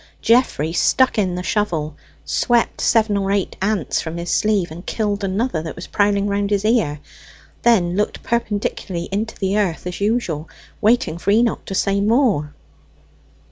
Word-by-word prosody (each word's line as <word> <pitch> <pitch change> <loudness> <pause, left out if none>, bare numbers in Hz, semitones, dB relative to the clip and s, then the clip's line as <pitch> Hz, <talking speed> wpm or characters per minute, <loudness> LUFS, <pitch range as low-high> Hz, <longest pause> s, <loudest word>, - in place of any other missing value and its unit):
Geoffrey 225 - +2
stuck 260 +5 +3
in 185 -3 0
the 180 - -4
shovel, 165 -8 -1 0.3
swept 235 - +1
seven 220 -2 +3
or 195 0 -1
eight 200 -2 -1
ants 195 -4 0
from 165 +1 -5
his 170 0 -4
sleeve, 205 -6 +1
and 170 +3 -9
killed 205 -2 -1
another 195 -2 -1
that 160 0 -6
was 175 - -8
prowling 205 -1 +1
round 200 0 0
his 205 0 0
ear, 215 -11 +1 0.6
then 185 -7 +3
looked 210 +1 -1
perpendicularly 205 -6 -2
into 215 +3 -2
the 195 +1 0
earth 180 -6 -1
as 180 +2 -5
usual, 190 -8 -1 0.3
waiting 215 -6 +2
for 195 - -2
Enoch 230 +3 +2
to 195 - -5
say 200 +1 +1
more. 205 - +2
200 Hz, 160 wpm, -20 LUFS, 175-220 Hz, 0.6 s, stuck